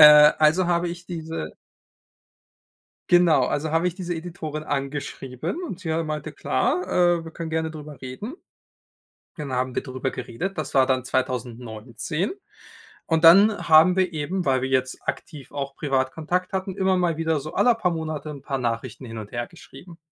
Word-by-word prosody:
Äh, 150 0 +10
also, 160 +4 +4
habe 175 0 +1
ich 175 0 -7
diese 165 -2 -5 1.6
genau, 175 -2 +5
also, 150 +1 -1
habe 165 +2 +2
ich 180 - -1
diese 180 -2 -4
Editorin 160 -2 -5
angeschrieben 140 - -4
und 240 - -5
sie, 170 -4 -4
äh, 160 +1 +1
meinte: 155 0 -4
„Klar, 180 - 0
äh, 175 -2 +2
wir 165 - -8
können 165 0 -5
gerne 160 0 -1
darüber 150 -3 -10
reden.“ 130 - -6 1.0
Dann 145 -5 -5
haben 125 0 -1
wir - - -1
drüber 130 0 -3
geredet, 160 +11 -5
das 155 -4 -4
war 130 -1 +5
dann 130 -2 +1
2019 125 - -3 0.7
und 160 0 +1
dann 200 +5 +7
haben 165 +3 +7
wir 185 -2 +2
eben, 165 +4 -2
weil 130 -2 +2
wir 130 - -1
jetzt 130 -1 0
aktiv 150 -6 -5
auch 140 -1 -4
privat 135 -3 0
Kontakt 180 +5 -2
hatten, 190 0 -2
immer 190 -1 +2
mal 175 -3 +1
wieder 160 -1 +1
so 155 - -7
alle 245 - +4
paar 190 -5 0
Monate 155 -2 -4
'n 145 -2 -8
paar 135 -2 -2
Nachrichten 120 0 -3
hin 115 -1 -7
und 105 -1 -8
hergeschrieben. 170 +7 -8
155 Hz, 175 wpm, -24 LUFS, 135-175 Hz, 1.6 s, Äh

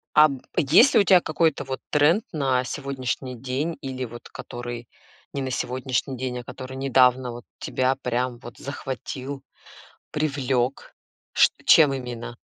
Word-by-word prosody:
А, 150 0 +8
б 135 -3 -6 0.2
есть 175 - +6
ли - - +6
у - - +4
тя 185 -3 +6
какой-то 160 -1 +1
вот 130 -1 -5
тренд 155 +9 +4
на 135 -5 +1
сегодняшний 130 -1 -4
день 135 +7 -3
или, 130 -2 -4
вот, 120 +1 -10
который 120 -1 -7 0.5
не 140 - -2
на 130 -1 -3
сегодняшний 130 +1 -2
день, 125 -1 -3
а - - -8
который 130 +1 -8
недавно, 130 -2 +3
вот, 120 0 -9
тебя 130 +1 0
прям, 125 0 -1
вот, 120 -1 -11
захватил, 135 0 -6 0.7
привлёк? 135 -4 -1 0.4
Ш - - +6 0.2
чем 145 -4 +7
именно? 120 -2 -6
130 Hz, 150 wpm, -24 LUFS, 125-140 Hz, 0.7 s, А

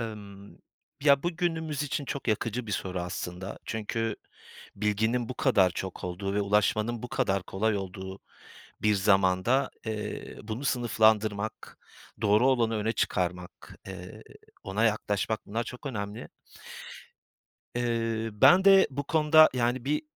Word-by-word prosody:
Emm, 100 -3 -8 0.4
ya, 140 -2 +5
bu 175 -1 -2
günümüz 160 -4 -1
için 145 0 -3
çok 135 -2 -5
yakıcı 115 +2 -1
bir 105 - -4
soru 90 0 -3
aslında. 90 +1 -5
Çünkü 110 0 -2 0.6
bilginin 110 +3 0
bu 130 - -5
kadar 95 -5 +3
çok 95 +1 -6
olduğu 95 +2 -3
ve 105 - +1
ulaşmanın 105 +3 +1
bu 125 - -5
kadar 95 -4 0
kolay 105 +3 -1
olduğu 95 0 -6 0.6
bir 105 -1 +3
zamanda, 95 +5 +2 0.2
eee, 105 -1 -5
bunu 110 +5 -5
sınıflandırmak, 110 -4 +1 0.4
doğru 105 +5 +4
olanı 115 -4 +2
öne 110 +2 0
çıkarmak, 90 -4 -3
eee, - - -9 0.4
ona 100 +4 0
yaklaşmak, 105 -1 -1
bunlar 115 +3 -2
çok 125 +5 -9
önemli. 105 -2 -5 1.5
Eee, 115 -2 -1
ben 175 - +6
de 195 -1 +7
bu 140 +1 -4
konuda 155 +1 +6
yani, 120 0 0
bir 145 +2 0
110 Hz, 130 wpm, -28 LUFS, 100-125 Hz, 1.5 s, de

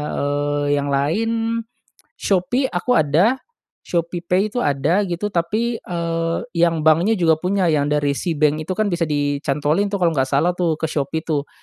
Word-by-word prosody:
eee, 145 0 0
yang 145 - -3
lain, 145 +11 0 0.9
Shopee 210 +8 +1
aku 190 +6 -1
ada, 195 - +3 0.4
Shopeepay 175 +4 -1
itu 245 - -1
ada 145 +7 +1
gitu 180 +4 -3
tapi, 220 +7 -1
eee, 165 -1 -2
yang 165 -2 +1
banknya 170 +8 +4
juga 160 -4 +2
punya 185 +2 0
yang 145 -1 +1
dari 145 -1 +1
Seabank 155 0 0
itu 185 - -4
kan 215 -3 0
bisa 170 -2 0
dicantolin 145 +4 0
tuh 200 - -2
kalau 170 -2 +2
nggak 135 -3 0
salah 145 +6 +2
tuh 175 -3 0
ke 160 - -5
Shopee 155 +2 -2
tuh 150 -3 -2
165 Hz, 160 wpm, -20 LUFS, 145-185 Hz, 0.9 s, banknya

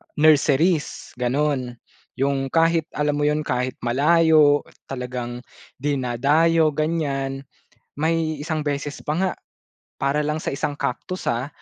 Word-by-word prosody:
nurseries 155 +2 +2
gano'n. 130 -1 0 0.4
Yung 135 0 0
kahit 165 +1 +2
alam 150 0 0
mo 145 - +2
yun 150 +1 +1
kahit 125 -2 -2
malayo 150 +3 +4 0.2
talagang 125 -2 -5 0.3
dinadayo 145 +4 +2
ganyan 140 -3 -2 0.5
may 155 0 0
isang 155 0 -2
beses 145 0 -3
pa 150 - 0
nga, 185 +1 +1 0.7
para 140 +2 0
lang 155 +1 -2
sa - - -2
isang 145 +1 -2
Cactus, 185 +9 -4
ah, 120 +3 -2
145 Hz, 120 wpm, -23 LUFS, 135-155 Hz, 0.7 s, malayo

